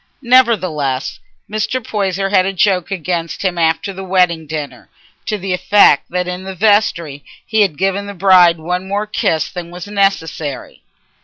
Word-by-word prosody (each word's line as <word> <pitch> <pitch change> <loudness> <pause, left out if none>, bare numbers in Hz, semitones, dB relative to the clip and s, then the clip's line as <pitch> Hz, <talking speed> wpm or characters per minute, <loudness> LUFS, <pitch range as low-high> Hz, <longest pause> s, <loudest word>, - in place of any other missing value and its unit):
Nevertheless, 185 - +1 0.3
Mr. 215 +4 -2
Poyser 195 -4 -2
had 190 -2 +3
a - - 0
joke 185 -2 +1
against 175 -2 -3
him 180 -3 -1
after 165 +4 0
the 190 +1 -7
wedding 180 -4 +1
dinner, 150 -2 -6 0.4
to 215 - -1
the 190 -1 -3
effect 180 -4 +4
that 180 0 -2
in 180 +1 -5
the 190 0 -7
vestry 175 -8 +1 0.2
he 220 -1 +1
had 185 -8 +1
given 195 +2 -1
the 200 - -7
bride 180 -2 +5
one 180 +4 -4
more 205 +2 -2
kiss 160 -7 -1
than 175 -2 -7
was 175 0 -8
necessary. 195 -8 -2
185 Hz, 160 wpm, -16 LUFS, 170-200 Hz, 0.4 s, bride